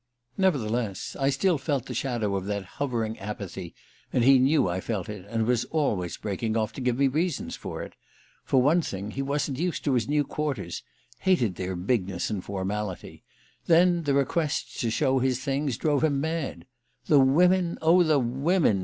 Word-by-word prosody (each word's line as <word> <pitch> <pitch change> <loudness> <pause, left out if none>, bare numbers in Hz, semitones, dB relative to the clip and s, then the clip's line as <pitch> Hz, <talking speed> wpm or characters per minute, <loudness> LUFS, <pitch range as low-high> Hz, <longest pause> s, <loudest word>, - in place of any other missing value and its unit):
Nevertheless, 120 - 0
I 135 0 +2
still 150 +4 +1
felt 140 -3 -1
the - - -6
shadow 115 -7 -1
of 95 -1 -2
that 100 -2 -2 0.2
hovering 115 -5 -1
apathy, 95 -4 -6 0.4
and 125 - +2
he 135 +1 +7
knew 135 -2 +3
I 90 +1 -2
felt 105 -4 -3
it, 105 -2 -8
and 115 -1 0
was 120 0 +1
always 105 - -1
breaking 110 +2 -2
off 110 -1 -1
to 135 - -7
give 125 -1 0
me 140 0 +4
reasons 160 +6 -1
for - - -6
it. - - -10 0.5
For 130 - +2
one 160 +6 +4
thing, 100 - -5
he 135 - -3
wasn't 140 -1 -1
used 175 0 -1
to 140 - +1
his 120 -1 0
new 150 0 +2
quarters 140 - -3 0.4
hated 170 - +2
their 95 +1 -4
bigness 95 -1 -1
and 100 -4 -3
formality; 100 0 -4 0.4
then 175 +1 +5
the 145 -3 0
requests 140 +3 -1
to 115 - 0
show 130 +3 +2
his 130 0 0
things 135 -2 -1
drove 150 -2 +1
him 145 -3 +2
mad. 160 -1 -3 0.4
"The 145 - +5
women 175 +6 +4
oh, 170 +3 +5
the 155 -3 +4
women!" 135 - +2
130 Hz, 180 wpm, -26 LUFS, 105-150 Hz, 0.5 s, he